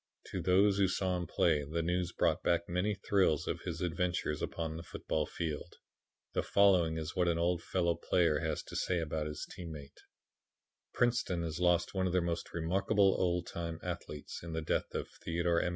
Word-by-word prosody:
To - - -2
those 100 +2 +4
who 95 - +5
saw 95 0 0
him 90 -2 -3
play 75 -1 +2
the 80 +4 -2
news 90 +1 0
brought - - +1
back 85 0 +1
many 90 +4 0
thrills 95 -6 +2
of - - -2
his - - -4
adventures 90 -3 -1
upon 80 -1 -3
the 80 - -5
football 80 -2 -2
field. 80 -4 -4 0.6
The - - +1
following 90 -5 +4
is 80 0 -4
what 90 -2 +2
an 85 -1 +2
old 85 +1 +1
fellow 85 -2 +1
player 85 -2 +2
has 80 -2 -2
to - - -10
say 90 - 0
about 80 -1 -2
his 75 - -5
team 85 -2 -8
mate: 70 -2 -11 0.9
"Princeton 120 -8 +1
has 80 0 -3
lost 90 -1 +2
one 95 -1 +1
of 90 - -2
her 90 - +3
most 85 0 -3
remarkable 95 +4 +2
old 90 -1 +1
time 85 -1 -4
athletes 85 -4 -6
in 85 -1 -6
the 80 - -1
death - - -1
of - - -2 0.2
Theodore 85 0 +1
M. - - 0
85 Hz, 195 wpm, -33 LUFS, 80-90 Hz, 0.9 s, who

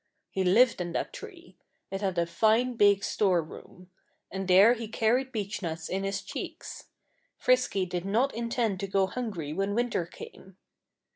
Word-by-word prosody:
He 190 - -1
lived 215 +4 +4
in 175 -1 -4
that - - -3
tree. - - -11 0.3
It 195 +1 -4
had 190 -3 -1
a 170 - +2
fine 220 +8 +2
big 200 -2 +4
storeroom. 180 -1 -2 0.4
And 195 -1 -4
there 195 +6 +7
he 230 -2 -5
carried 240 +4 +1
beechnuts 190 -7 -4
in 195 +1 -2
his 195 0 -2
cheeks. - - -7 0.5
Frisky 250 -7 +2
did 175 -1 -4
not 230 +8 +1
intend 230 -4 -1
to 195 - -3
go 195 0 +2
hungry 190 -8 -4
when 195 +4 -1
winter 235 -8 0
came. 190 +1 -12
195 Hz, 155 wpm, -28 LUFS, 185-230 Hz, 0.5 s, there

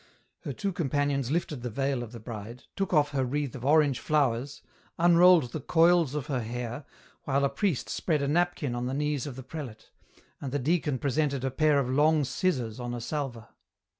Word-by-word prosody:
Her - - -2
two 200 -3 -3
companions 145 -5 0
lifted 150 -4 -2
the 125 - -3
veil 135 +2 -1
of 120 -2 -7
the 120 - -9
bride, 115 +1 -8
took 195 -2 -2
off 150 -4 +3
her 135 -2 0
wreath 140 +1 -2
of 125 - -8
orange 145 -2 +3
flowers, 140 -2 0 0.3
unrolled 175 -5 +5
the 155 - -4
coils 165 -1 +3
of 145 -3 -2
her 135 -4 -1
hair, 120 +4 -5 0.4
while 140 0 +2
a - - +2
priest 180 - -1
spread 155 -5 -1
a - - 0
napkin 165 -3 0
on 120 +1 -2
the 130 - -2
knees 150 -1 -1
of 135 - -6
the 130 - -8
prelate, 130 -5 -8 0.5
and 135 - -4
the 145 - 0
deacon 150 0 0
presented 140 0 0
a 135 - -1
pair 150 +2 +3
of 140 -3 +1
long 150 +4 +3
scissors 130 - -1
on 120 0 -4
a - - -4
salver. 125 -3 -4
140 Hz, 195 wpm, -28 LUFS, 125-155 Hz, 0.5 s, unrolled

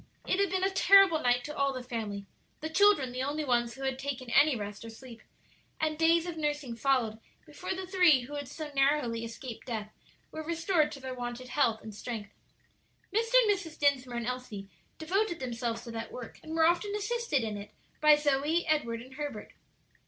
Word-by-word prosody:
It 370 - +1
had 400 - +3
been 375 +1 0
a 385 - +3
terrible 385 -3 +6
night 245 -1 +2
to 300 - -6
all 280 0 +1
the 255 -1 -5
family 215 -5 -4 0.3
the 315 +1 -5
children 385 -8 +4
the 250 +1 -4
only 295 +3 -2
ones 240 -2 +1
who 270 - -8
had 265 -1 -1
taken 265 -3 -4
any 295 +1 +5
rest 205 -1 -6
or 230 - -8
sleep 230 +1 -12 0.6
and 310 0 0
days 330 +1 +3
of 345 -2 -5
nursing 295 -5 -2
followed 230 -3 +1 0.3
before 325 +5 -5
the 375 0 -5
three 360 -8 +5
who 255 +4 -9
had 285 -2 -4
so 300 +3 -7
narrowly 275 -4 +2
escaped 230 +2 -8
death 215 -3 -4 0.4
were 315 - -5
restored 330 -1 +1
to 275 - -8
their 260 -1 -6
wonted 245 0 -6
health 230 -7 +1
and 220 - -8
strength. 215 -1 -6 0.8
Mr. 455 +3 0
and 425 - +4
Mrs. 355 -6 -3
Dinsmore 255 -4 +1
and 235 - -3
Elsie 235 -6 -5 0.3
devoted 365 +3 0
themselves 235 -2 -3
to 235 - -8
that 225 0 -6
work, 250 -2 -9
and 320 0 -6
were 325 -1 +4
often 355 +5 +2
assisted 420 - 0
in 215 -2 -3
it 205 0 -8 0.3
by 305 0 +7
Zoe, 295 +3 +1
Edward, 235 -8 0
and 260 +1 -14
Herbert. 290 -6 -6
275 Hz, 195 wpm, -30 LUFS, 240-320 Hz, 0.8 s, by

